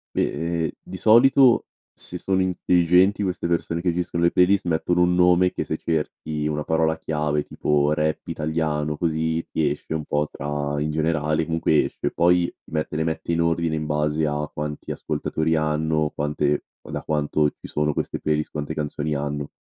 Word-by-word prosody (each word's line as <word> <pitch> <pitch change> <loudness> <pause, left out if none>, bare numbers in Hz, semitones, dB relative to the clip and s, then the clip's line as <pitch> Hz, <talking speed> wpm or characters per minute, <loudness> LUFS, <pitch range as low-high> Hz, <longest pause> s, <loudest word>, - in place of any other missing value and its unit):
Beh 85 +2 -1
ehm, 80 - 0
di 95 - -8
solito 120 +3 +5 0.3
se 90 - 0
sono 95 +1 0
intelligenti 90 +2 +3
queste 90 -3 -2
persone 85 -1 -1
che 90 -2 +1
gestiscono 85 -1 -2
le 85 - +4
playlist 90 +1 +3
mettono 85 +1 +1
un 90 0 +3
nome 90 0 +4
che - - -3
se - - -3
cerchi 75 -1 -2
una 75 0 -2
parola 80 0 +1
chiave 75 -2 -1
tipo 75 0 +1
"rap 75 0 -1
italiano", 75 -1 -2
così, 80 0 -1
ti 75 -3 +1
esce 75 +2 -5
un 75 -1 -3
po' 75 +1 0
tra 75 0 -3
in 75 - -1
generale 75 0 0
comunque 80 -2 +2
esce. - - -3
Poi 85 0 +3 0.2
mette 75 -1 -2
le 80 - 0
mette 80 +1 -3
in 85 - +1
ordine 85 -1 +1
in 75 0 -3
base 75 +1 0
a 75 0 -2
quanti 75 0 -5
ascoltatori 80 +1 -1
hanno, 75 0 0
quante 75 0 0 0.2
da - - -6
quanto 75 0 +1
ci - - -12
sono 75 0 0
queste - - -3
playlist, 75 0 -1
quante 75 +1 -4
canzoni 75 0 -2
hanno. 75 0 -3
80 Hz, 175 wpm, -23 LUFS, 75-85 Hz, 0.3 s, solito